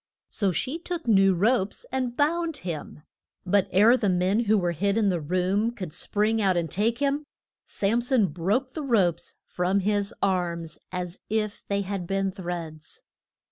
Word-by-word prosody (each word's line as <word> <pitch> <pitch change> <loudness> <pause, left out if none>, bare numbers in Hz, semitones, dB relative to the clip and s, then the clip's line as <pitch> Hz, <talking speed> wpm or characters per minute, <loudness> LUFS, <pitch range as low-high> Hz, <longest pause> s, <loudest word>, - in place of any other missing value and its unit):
So 200 -4 0
she 260 - -2
took 345 -4 -5
new 195 -3 +5
ropes 205 +2 +1
and 250 -2 -2
bound 325 +1 +1
him. 155 -3 -6 0.4
But 195 +1 +2
ere 215 +6 +6
the 215 -6 +1
men 185 +5 +1
who 215 +1 +4
were 175 -3 +1
hid 200 +5 0
in 210 -3 +3
the 175 -3 0
room 185 +7 +1
could 185 -10 -7
spring 215 +2 0
out 190 -3 +2
and 165 -2 -1
take 225 +5 +1
him, 285 +1 0 0.4
Sam 215 +4 0
son 245 -3 +2
broke 195 - -1
the 315 - -4
ropes 200 - +1
from 185 +3 0
his 205 0 0
arms 170 -4 -1
as 180 -1 -5
if 215 -1 -2
they 200 0 0
had 195 -2 -4
been 195 0 0
threads. 170 -4 -7
200 Hz, 170 wpm, -26 LUFS, 180-230 Hz, 0.4 s, ere